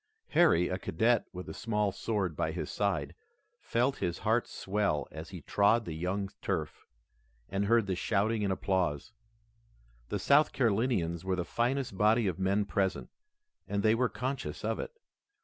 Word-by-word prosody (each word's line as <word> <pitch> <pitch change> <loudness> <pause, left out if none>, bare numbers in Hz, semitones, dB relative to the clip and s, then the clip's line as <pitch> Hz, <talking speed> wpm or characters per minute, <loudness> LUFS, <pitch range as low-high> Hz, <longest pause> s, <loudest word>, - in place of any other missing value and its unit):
Harry, 125 - +4
a 95 - -2
cadet 115 +8 +1
with 90 0 -7
a - - -6
small 105 -3 0
sword 100 -4 -2
by - - -1
his - - -4
side, 95 -8 -1 0.5
felt 125 +4 0
his 85 - -2
heart - - +2
swell 95 -7 -1
as 80 +2 -8
he 90 -4 -8
trod 105 +7 +3
the 85 - -4
young 90 +5 -2
turf, - - -3 0.6
and 100 +1 0
heard 115 +1 +4
the 95 - -1
shouting 105 +3 0
and 100 - +1
applause. 90 -7 -1 1.0
The 105 - -1
South 140 +9 +4
Carolinians 100 -8 +1
were 95 0 0
the 90 -1 -2
finest 120 -3 -1
body 110 +2 +4
of 95 -1 -1
men 100 +2 +1
present, 95 -1 -1 0.6
and 100 0 -1
they 110 - +5
were 125 +1 +2
conscious 130 +2 -4
of - - -1
it. - - -4
100 Hz, 165 wpm, -31 LUFS, 90-115 Hz, 1.0 s, they